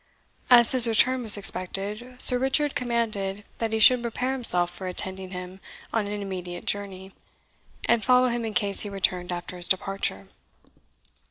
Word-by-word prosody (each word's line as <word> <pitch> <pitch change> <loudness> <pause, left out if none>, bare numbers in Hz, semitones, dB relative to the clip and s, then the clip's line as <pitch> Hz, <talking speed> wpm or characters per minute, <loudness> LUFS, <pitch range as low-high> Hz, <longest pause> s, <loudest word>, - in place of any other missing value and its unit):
As 240 -2 +6
his 250 -3 +2
return 250 +3 +3
was 220 -3 0
expected, 205 +6 -5
Sir 250 -1 +5
Richard 270 +3 +1
commanded 215 -5 -3 0.2
that 225 -1 -2
he 220 - 0
should 245 +3 +6
prepare 240 +2 -3
himself 180 -9 +4
for 190 - -8
attending 190 +1 -3
him 180 0 -9 0.3
on 220 -3 -1
an 205 0 -5
immediate 180 -2 -7
journey, 195 -1 -4 0.7
and 235 -2 +1
follow 250 0 +3
him 235 0 -3
in 220 -2 -5
case 205 -4 +1
he 205 - +1
returned 180 -2 -1
after 175 +1 -6
his 175 - -5
departure. 190 - -2
205 Hz, 160 wpm, -25 LUFS, 190-240 Hz, 0.7 s, As